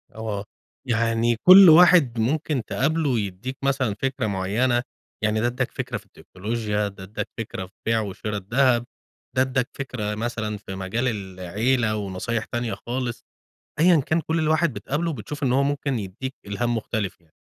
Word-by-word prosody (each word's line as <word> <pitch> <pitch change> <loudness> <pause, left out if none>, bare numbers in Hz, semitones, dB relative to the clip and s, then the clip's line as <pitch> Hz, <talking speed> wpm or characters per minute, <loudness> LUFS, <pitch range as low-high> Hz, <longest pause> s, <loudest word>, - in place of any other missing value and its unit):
آه. 105 -2 -4 0.4
يعني 115 0 +2
كل 185 - +9
واحد 160 -8 +6
ممكن 145 +2 0
تقابله 155 +2 0
ويدّيك 110 +2 -2
مثلًا 130 -6 +1
فكرة 135 -4 -1
معيّنة. 110 +6 +1 0.4
يعني 110 0 +2
ده 120 - +2
ادّاك 125 +1 -2
فكرة 130 -3 -4
في 105 - -13
التكنولوجيا، 105 +2 -3
ده 95 -1 -10
ادّاك 100 +3 -5
فكرة 105 -4 -5
في 95 - -19
بيع 115 0 +2
وشِرا 105 +1 -4
الدهب، 120 +4 +2 0.5
ده 130 - +4
ادّاك 130 -1 0
فكرة 110 -6 -4
مثلًا 110 -2 -3
في 95 -1 -8
مجال 95 +7 -2
العيلة 110 +3 -1
ونصايح 105 +3 -3
تانية 120 -3 -3
خالص. 120 -1 -3 0.6
أيًا 170 -2 +6
كان 160 +4 0
كل 160 +2 -1
ال 155 -1 +1
واحد 160 -1 +2
بتقابله، 165 +3 -2
بتشوف 140 +4 -7
إن 130 -3 +2
هو 135 +2 +3
ممكن 140 -2 -1
يدّيك 110 +7 -6
إلهام 120 +4 -1
مختلف 105 -4 -3
يعني. 80 -2 -31
120 Hz, 160 wpm, -24 LUFS, 105-135 Hz, 0.6 s, كل